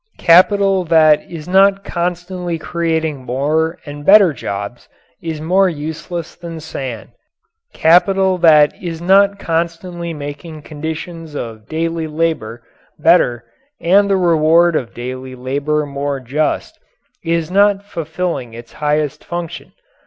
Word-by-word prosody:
Capital 195 +2 +4
that 155 -2 +5
is 165 -2 -8
not 195 +1 +4
constantly 175 0 -3
creating 160 -4 -2
more 150 +7 -1
and 145 0 -8
better 195 -1 +6
jobs 100 -1 -6 0.3
is 160 -2 -5
more 185 +5 +2
useless 160 +2 -6
than 170 -2 -8
sand. 135 -7 -6 0.6
Capital 190 +3 +3
that 155 -3 +5
is 170 -3 -5
not 200 +3 +4
constantly 170 0 -3
making 150 +1 -8
conditions 160 +1 -7
of 110 -5 -7
daily 165 0 -2
labour 150 -8 -2 0.3
better 150 -8 +3 0.4
and 200 +4 +3
the 195 - +3
reward 170 -1 +3
of 125 -6 -3
daily 130 +1 -6
labour 140 +4 -2
more 140 0 -3
just, 140 +5 -2 0.4
is 165 0 -1
not 200 +1 +3
fulfilling 160 - -4
its 120 0 -12
highest 150 -1 -1
function. 175 -1 -6
160 Hz, 120 wpm, -17 LUFS, 145-175 Hz, 0.6 s, better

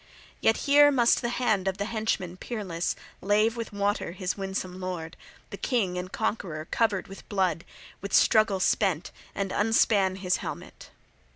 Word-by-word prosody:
Yet 225 - +3
here 290 0 +7
must 245 -4 +3
the 240 - -1
hand 220 -6 0
of 190 0 -1
the 200 - -2
henchman 215 -5 -2
peerless 185 -5 -3 0.3
lave 210 +3 +2
with 230 -1 -5
water 205 -3 -1
his 185 0 -3
winsome 190 -2 -4
lord, 175 -3 -5 0.4
the - - -6
king 210 -9 0
and 180 +1 -5
conqueror 185 -8 -3
covered 215 -5 +1
with 195 - -12
blood, 185 -5 0 0.4
with 200 - -6
struggle 215 -4 +4
spent, 185 -3 +1 0.2
and 195 -1 -2
unspan 205 -3 +3
his 180 -2 0
helmet. - - -8
200 Hz, 155 wpm, -27 LUFS, 185-225 Hz, 0.4 s, here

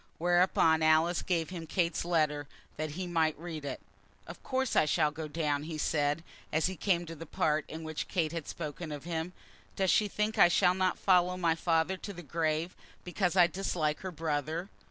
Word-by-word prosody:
Whereupon 175 -2 +3
Alice 160 +2 +3
gave 170 -2 -1
him 170 -3 -6
Kate's 170 0 0
letter, 150 -4 0 0.3
that 155 -1 -4
he 185 - -2
might 165 -3 +1
read 160 -2 -6
it. 140 - -4 0.5
"Of 170 - -10
course 260 -1 -1
I - - +5
shall 150 0 +2
go 155 +1 -6
down," 150 -2 -1
he 160 -1 -5
said, 150 +1 0 0.3
as 155 +1 +1
he 185 - -1
came 175 -1 0
to 165 - -7
that 165 0 -9
part 155 -1 +1
in 160 +1 -7
which 155 -1 -4
Kate 165 -5 0
had 165 -3 -5
spoken 155 0 -6
of 145 -2 -6
him. 165 +1 -3 0.4
"Does 190 -2 +2
she 210 - +3
think 210 +2 -1
I - - +9
shall 180 +1 +4
not 185 0 0
follow 180 -1 +3
my 170 -3 +2
father 165 +2 +1
to 200 +2 -7
the 175 -1 -9
grave, 160 +2 -1 0.3
because 180 0 -1
I 180 -2 +7
dislike 170 -4 -1
her 190 - -5
brother? 160 +2 -2
165 Hz, 195 wpm, -31 LUFS, 155-180 Hz, 0.5 s, I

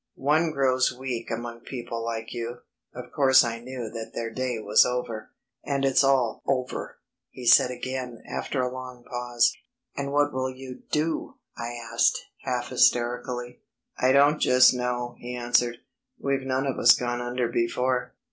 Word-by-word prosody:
One 155 +5 +2
grows 130 -3 +2
weak 125 -2 -5
among 115 0 -5
people 120 -2 -6
like 115 -1 -4
you. 120 0 -5 0.3
Of - - -9
course 130 -2 +5
I 115 -1 -3
knew 125 -1 -6
that 115 -1 -7
their 115 -1 -3
day 130 -2 -2
was 110 0 +5
over.... 120 -3 -3 0.3
And 140 -1 -1
it's 135 +1 +4
all 130 -4 +2
over," 130 -2 -2 0.3
he 125 - -10
said 120 +1 +7
again 125 -1 -5
after 130 -3 -2
a 125 0 -2
long 130 -1 -8
pause. 120 -1 0 0.4
"And 140 0 -3
what 145 0 +2
will 130 0 -1
you 130 0 -9
do?" 155 +1 -1 0.2
I 120 0 -5 0.2
asked, 115 - +3 0.2
half 125 -2 -3
hysterically. 125 0 +1 0.4
"I 130 - +2
don't 145 +2 +5
just 125 0 +6
know," 120 -1 -3
he 125 +1 -6
answered; 120 0 +1 0.4
"we've 135 -1 -2
none 130 +1 0
of 135 - -2
us 120 - +7
gone 120 0 -2
under 120 0 -1
before. 125 +2 -1
125 Hz, 160 wpm, -26 LUFS, 120-130 Hz, 0.4 s, said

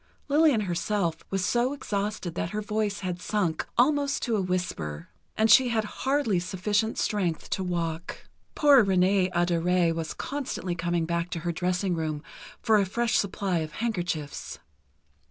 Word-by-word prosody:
Lillian 290 -5 +4
herself 175 -1 -1
was 195 -1 -1
so 240 +5 +1
exhausted 205 - -3
that 165 - -2
her 210 +3 -3
voice 210 -1 -1
had 180 -2 -4
sunk 180 -7 -1
almost 280 +2 +2
to 235 -3 0
a 205 - +1
whisper, 175 - -3 0.3
and 220 - +4
she 255 +2 +7
had 225 -2 +1
hardly 260 -2 0
sufficient 205 +5 -1
strength 185 -7 -1
to 190 - -1
walk. 170 -1 -4 0.3
"Poor 285 -5 +6
Renée 190 -1 +3
Adorée 175 0 +2
was 160 -1 -4
constantly 270 -10 -3
coming 175 -1 -1
back 170 +1 -1
to 175 -2 -4
her 175 +1 -1
dressing 180 +2 -1
room 155 -2 -3 0.4
for 220 -2 +4
a 200 - +2
fresh 235 +4 0
supply 190 -2 -1
of 155 -1 -5
handkerchiefs. 175 -10 -3
185 Hz, 155 wpm, -27 LUFS, 170-220 Hz, 0.4 s, she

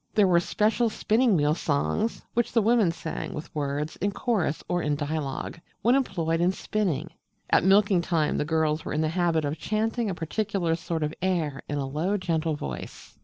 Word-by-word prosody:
There 210 - +6
were 175 -2 +5
special 220 +6 +1
spinning 220 -1 +2
wheel 150 0 +3
songs, 165 +8 -1
which 240 0 +1
the 230 - +4
women 220 -5 +4
sang, 165 -1 -5
with 150 +2 -7
words, 145 +1 -2
in 200 +2 0
chorus 195 - -1
or 175 0 0
in 150 -2 0
dialogue, 145 +1 -3 0.2
when 240 - +5
employed 165 -11 +1
in 175 +1 +4
spinning. 180 -7 -2 0.4
At - - +5
milking 195 -1 +5
time 165 -3 0
the - - +2
girls 155 0 0
were - - -4
in 150 - +1
the 155 - +1
habit 165 -2 +1
of 145 +2 -3
chanting 220 +3 -1
a 185 - -2
particular 180 0 -1
sort 165 -1 -2
of 150 +1 -2
air, 165 -7 0
in 145 - -1
a 140 - -1
low 160 +9 -1
gentle 165 -4 -1
voice. 70 - -7
170 Hz, 190 wpm, -26 LUFS, 155-205 Hz, 0.4 s, There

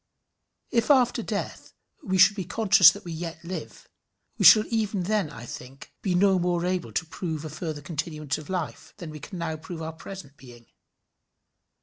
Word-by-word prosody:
If 230 +1 +1
after 255 -4 +4
death - - -5 0.3
we 190 -1 -1
should 200 +3 +6
be 195 - -3
conscious 195 -1 +6
that 170 - -6
we 170 - -6
yet 165 0 -6
live, 180 +2 -7 0.5
we - - +1
shall 215 - +9
even 215 -4 0
then, 200 -3 0
I 120 -4 -10
think, 130 +3 -10
be 185 -3 0
no 190 0 +4
more 175 0 0
able 180 -1 -2
to 175 - -1
prove 160 -2 -5
a 155 - -6
further 155 -2 -5
continuance 155 -1 -3
of 155 - -12
life, 180 -5 -5
than 170 -5 -8
we 155 - -9
can 185 +6 -8
now 165 -2 -3
prove 165 +1 -8
our 160 0 -5
present 160 -4 -10
being. 120 -2 -15
175 Hz, 185 wpm, -26 LUFS, 155-190 Hz, 0.5 s, shall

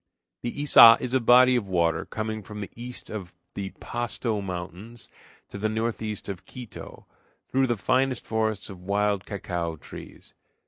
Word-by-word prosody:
The 120 - -3
Iça 130 -5 +8
is 125 0 -3
a 130 - +4
body 125 +2 +6
of 115 -5 -1
water 85 -3 +1
coming 110 0 -4
from 105 +1 -9
the 100 - -6
east 120 +1 -6
of 95 -5 -7 0.2
the 100 -1 -4
Pasto 120 -2 -2
Mountains 95 +5 -7 0.4
to 100 - -8
the 110 +1 0
northeast 110 -1 -3
of 95 -3 -6
Quito, 125 -3 -10 0.5
through 135 0 +3
the 120 -2 0
finest 130 +3 +1
forests 110 -3 -1
of 90 -2 -11
wild 100 +1 0
cacao 85 -5 -3
trees. 75 - -12
110 Hz, 155 wpm, -26 LUFS, 95-120 Hz, 0.5 s, Iça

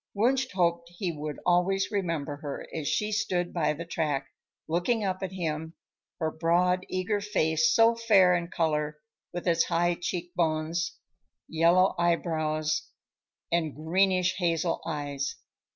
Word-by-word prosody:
Wunsch 255 +5 +2
hoped 170 -2 +1
he 180 -3 -1
would 150 -1 -5
always 180 +2 +2
remember 165 -8 -2
her 145 -1 -6
as 155 -3 -3
she 210 0 0
stood 180 -4 -1
by 160 -3 +1
the 170 +3 -7
track, 145 -5 -2 0.4
looking 180 +8 +1
up 185 -1 -2
at 190 -2 -3
him; 160 -3 -4 0.4
her 160 -1 0
broad 180 +3 +1
eager 185 +3 -1
face, 160 -6 +2
so 230 +1 +5
fair 205 -6 +5
in 170 -1 -2
color, 150 -3 -1 0.3
with 175 +1 -5
its 165 -1 +3
high 175 +1 +2
cheek 175 0 -4
bones, 165 0 -1 0.5
yellow 170 +4 +4
eyebrows 155 -3 0 0.6
and 165 -3 0
greenishhazel 175 0 +1
eyes. 145 -3 -3
170 Hz, 135 wpm, -28 LUFS, 160-185 Hz, 0.6 s, so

